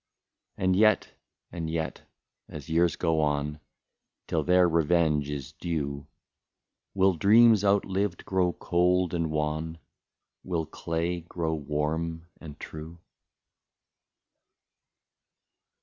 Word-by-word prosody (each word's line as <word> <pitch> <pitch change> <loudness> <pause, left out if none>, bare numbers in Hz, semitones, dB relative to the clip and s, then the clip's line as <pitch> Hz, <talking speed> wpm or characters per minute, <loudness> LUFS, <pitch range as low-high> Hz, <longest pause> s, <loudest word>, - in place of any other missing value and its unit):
And 95 0 +1
yet, 110 +1 +3 0.4
and 85 -2 -4
yet, 80 0 -4 0.4
as 75 +2 -9
years 85 +1 +2
go 80 -2 0
on, 75 0 -1 0.7
Till - - 0
their 90 0 +4
revenge 80 -3 +2
is 70 -1 -5
due, 75 -4 -4 0.9
Will 95 0 +4
dreams 110 +4 +5
outlived 100 -2 0
grow 95 -2 +1
cold 90 0 +1
and 85 -2 -1
wan, 75 +1 -2 0.7
Will 85 -3 -2
clay 85 +2 -3
grow 80 -2 -2
warm 80 +2 -2
and 75 -3 -11
true 80 +2 -9
85 Hz, 100 wpm, -27 LUFS, 75-90 Hz, 0.9 s, dreams